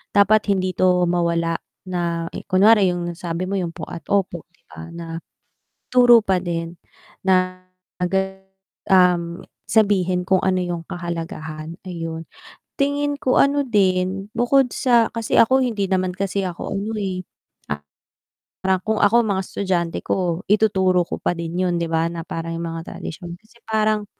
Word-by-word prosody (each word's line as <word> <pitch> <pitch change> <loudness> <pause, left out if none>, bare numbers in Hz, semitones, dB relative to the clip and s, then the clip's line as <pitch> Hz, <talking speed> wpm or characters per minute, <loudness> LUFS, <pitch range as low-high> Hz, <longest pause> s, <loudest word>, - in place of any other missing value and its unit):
dapat 205 +2 +4
hindi 185 -2 +1
ito 180 -1 +3
mawala 170 -1 0 0.3
na 170 -2 -2 0.2
kunwari 200 +1 +5
yung 175 -1 -3
sabi 170 0 -3
mo 195 +2 -3
yung 175 -2 -2
po 160 - -6
at 170 -2 -7
opo 190 -4 0
'di 175 - -35
ba, 80 0 -10
na 170 0 -7 0.9
ituro 245 -2 +7
pa 190 -2 +2
din 170 -1 -3 0.5
na, 185 -1 +1 1.3
um, 180 -2 +3 0.2
sabihin 185 -4 +2
kung 190 -2 +4
ano 185 -1 +2
yung 175 -1 -3
kahalagahan, 165 -2 -6
ayun, 165 -2 -5 0.5
tingin 285 0 0
ko 255 - +1
ano 280 0 +3
din 195 -2 +1
bukod 250 +2 +3
sa 240 -3 +3
kasi 230 -2 -3
ako 260 +4 +5
hindi 215 -5 -1
naman 185 -1 0
kasi 195 0 -1
ako 175 -2 -5
ano 200 +3 -3
eh 185 -3 -3 1.4
Parang 190 0 +2
kung 220 0 0
ako 205 +3 +4
mga 195 -3 0
estudyante 180 -3 -2
ko 180 -1 -1
ituturo 190 -3 +3
ko - - -5
pa - - 0
din 170 0 -5
yun 180 -1 +1
'di 170 - -1
ba, 165 0 +2
na 170 0 -5
parang 165 0 -5
yung 170 0 -4
mga 165 0 -7
tradisyon 170 +1 -7
kasi 215 +3 -24
parang, 215 -1 +1
185 Hz, 150 wpm, -21 LUFS, 170-205 Hz, 1.4 s, ituro